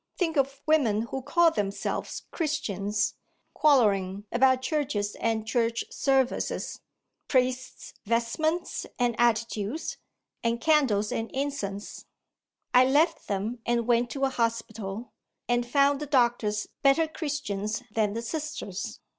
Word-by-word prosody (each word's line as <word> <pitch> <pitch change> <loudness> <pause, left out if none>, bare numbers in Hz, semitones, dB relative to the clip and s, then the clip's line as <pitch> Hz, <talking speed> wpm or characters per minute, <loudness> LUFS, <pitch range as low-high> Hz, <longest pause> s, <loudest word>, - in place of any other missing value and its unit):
Think 335 -3 0
of 275 -1 0
women 240 -9 +3
who 265 +3 -4
call 330 +5 +4
themselves 200 -8 -3
Christians, 210 - -1 0.4
quarrelling 205 -9 +3
about 260 +1 +3
churches 260 -8 -1
and 225 -1 0
church 230 0 0
services 270 -2 0 0.5
priest's 255 -1 -1
vestments 310 +10 0
and 245 -1 +2
attitudes, 230 +3 0 0.5
and 230 0 +1
candles 245 -9 +3
and 225 0 -2
incense! 260 -8 -4 0.7
I 250 - +8
left 310 +5 +2
them, 210 +4 -2
and 235 0 +1
went 240 0 +2
to 275 +1 -1
a - - +1
hospital, 225 -3 -3 0.3
and 240 0 0
found 280 +1 +3
the 300 - -5
doctors 235 -6 +2 0.2
better 275 +4 +4
Christians 270 - -3
than 210 -2 +1
the 230 +1 -4
Sisters. 295 - -5
240 Hz, 120 wpm, -27 LUFS, 215-280 Hz, 0.7 s, I